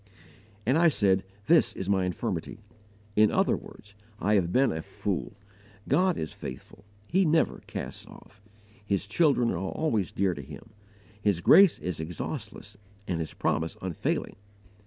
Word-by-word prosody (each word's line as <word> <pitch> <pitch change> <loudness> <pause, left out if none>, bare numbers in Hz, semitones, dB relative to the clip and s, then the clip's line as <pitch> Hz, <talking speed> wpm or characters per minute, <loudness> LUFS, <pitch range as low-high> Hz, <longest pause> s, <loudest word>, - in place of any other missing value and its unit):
"And 130 +8 +3
I 170 - +6
said, 95 - +2 0.2
This 165 0 +4
is 95 - -5
my 95 -2 +2
infirmity." 90 - -3 0.6
In 105 0 +5
other - - +2
words, 105 -1 -12 0.3
"I 105 +3 +1
HAVE 90 -4 +2
BEEN 130 +6 +3
A 80 - -3
FOOL!" - - -4 0.5
God 180 +5 +2
is 80 - -4
faithful. 65 +9 -9 0.2
He 190 +3 +3
never 160 -1 +2
casts - - -6
off. 105 +2 -16 0.4
His 100 -1 -1
children 125 - +2
are 85 - -2
always 105 - -1
dear 95 -1 +1
to 70 - -7
Him. 75 +10 -12 0.5
His 100 -5 +1
grace 190 - +7
is 90 -3 -4
exhaustless 90 +5 -6 0.3
and 85 -2 -1
His 80 - -5
promise 80 0 -1
unfailing. 95 -4 -3
100 Hz, 150 wpm, -28 LUFS, 90-135 Hz, 0.6 s, grace